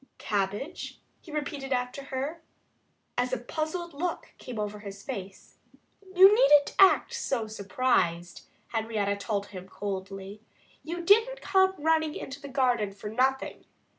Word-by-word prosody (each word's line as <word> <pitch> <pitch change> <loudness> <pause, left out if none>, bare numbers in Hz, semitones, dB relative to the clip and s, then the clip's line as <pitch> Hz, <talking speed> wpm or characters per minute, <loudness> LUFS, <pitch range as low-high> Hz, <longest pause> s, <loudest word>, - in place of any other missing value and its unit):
"Cabbage?" 205 - -3 0.2
he 325 - -13
repeated 285 -2 -4
after 250 +2 -2
her 280 +5 -4 0.8
as 250 +1 +1
a 255 - 0
puzzled 315 +7 -4
look 345 +5 -4
came 250 -3 -7
over 210 0 -3
his 200 -1 -9
face. 195 -1 -8 0.6
"You 385 +3 +9
needn't 360 -12 +5
act 390 -1 +6
so 240 -5 -1
surprised," 200 -5 -1 0.2
Henrietta 220 -3 -1
told 200 -1 -2
him 185 0 -8
coldly. 195 +1 -6 0.4
"You 345 +2 -5
didn't 455 +7 +4
come 380 -1 +3
running 315 0 +1
into 280 +1 -7
the 285 - -7
garden 245 -7 +1
for 210 +1 -7
nothing. 265 +4 0
255 Hz, 135 wpm, -28 LUFS, 205-315 Hz, 0.8 s, You